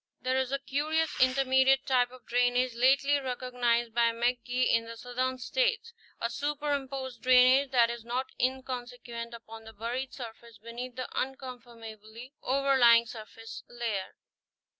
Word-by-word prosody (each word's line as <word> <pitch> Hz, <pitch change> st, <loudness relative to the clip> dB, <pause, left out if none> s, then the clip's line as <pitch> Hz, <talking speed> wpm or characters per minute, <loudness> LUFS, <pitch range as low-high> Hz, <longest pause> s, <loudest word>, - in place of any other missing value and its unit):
There 260 Hz, +1 st, 0 dB
is 260 Hz, -1 st, -2 dB
a 275 Hz, -, +1 dB
curious 305 Hz, +4 st, -1 dB
intermediate 265 Hz, +1 st, +3 dB
type 250 Hz, -2 st, +2 dB
of 255 Hz, 0 st, -16 dB
drainage 245 Hz, +1 st, +1 dB
lately 275 Hz, +4 st, +3 dB
recog 255 Hz, -1 st, -5 dB
nized 235 Hz, -1 st, +1 dB
by 235 Hz, 0 st, +3 dB
McGee 245 Hz, +2 st, 0 dB
in 230 Hz, 0 st, +2 dB
the 230 Hz, 0 st, -9 dB
southern 255 Hz, +2 st, -2 dB
states, 470 Hz, -, -1 dB, 0.3 s
a -, -, 0 dB
superimposed 275 Hz, -2 st, -3 dB
drainage 255 Hz, +2 st, +5 dB
that 240 Hz, -3 st, +3 dB
is 235 Hz, -1 st, -7 dB
not 245 Hz, +3 st, -2 dB, 0.2 s
inconsequent 245 Hz, -2 st, -4 dB
upon 225 Hz, -1 st, -11 dB
the 225 Hz, 0 st, -12 dB
buried 240 Hz, +5 st, -4 dB
surface 235 Hz, -2 st, -10 dB
beneath 235 Hz, +3 st, -8 dB
the 255 Hz, -, -4 dB
unconformably 240 Hz, -3 st, -7 dB
overlying 260 Hz, -3 st, +4 dB
surface 225 Hz, 0 st, -10 dB
layer. 230 Hz, -5 st, -4 dB
250 Hz, 140 wpm, -29 LUFS, 235-265 Hz, 0.3 s, drainage